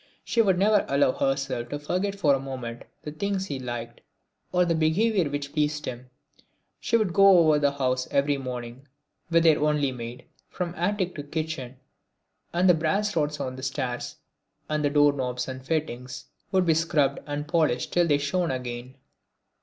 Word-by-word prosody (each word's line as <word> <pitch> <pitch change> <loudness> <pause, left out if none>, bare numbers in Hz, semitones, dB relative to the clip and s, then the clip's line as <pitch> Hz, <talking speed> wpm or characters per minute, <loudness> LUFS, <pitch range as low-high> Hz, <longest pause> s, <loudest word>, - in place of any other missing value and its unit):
She 235 - +2
would 190 -4 +3
never 205 +2 +4
allow 140 -1 +3
herself 135 -3 -1
to 145 - -3
forget 185 +7 -2
for 155 -8 +3
a 135 - +1
moment 125 -3 -6 0.2
the 150 - -5
things 190 +4 -2
he 140 -7 -4
liked, 120 -2 -6 0.5
or 180 0 +3
the 170 - +1
behaviour 170 +3 +2
which 145 0 -4
pleased 150 -1 0
him. 125 0 -7 0.7
She 230 - +2
would 210 -6 0
go 195 -1 +7
over 155 -3 +5
the 145 -1 +2
house 130 -2 -1
every 140 0 +1
morning, 125 +1 -7 0.4
with 165 -1 +4
their 160 -3 +5
only 150 -2 +2
maid, 120 -1 -8 0.2
from 175 -2 -4
attic 180 +1 -1
to 145 - -4
kitchen, 150 -4 -4 0.8
and 180 +2 +2
the 180 - +7
brass 185 +6 0
rods 150 -1 0
on 130 0 -4
the - - -7
stairs 130 -2 -3 0.5
and 150 0 -1
the 145 - +3
door 145 0 +4
knobs 125 -2 -3
and 130 0 -7
fittings 135 -3 -3 0.3
would 190 -2 +3
be 165 - +4
scrubbed 155 -3 +1
and 145 0 -4
polished 155 -7 +1
till 175 -1 +3
they 145 -3 +3
shone 165 +5 -1
again. 125 0 -5
145 Hz, 175 wpm, -26 LUFS, 130-170 Hz, 0.8 s, go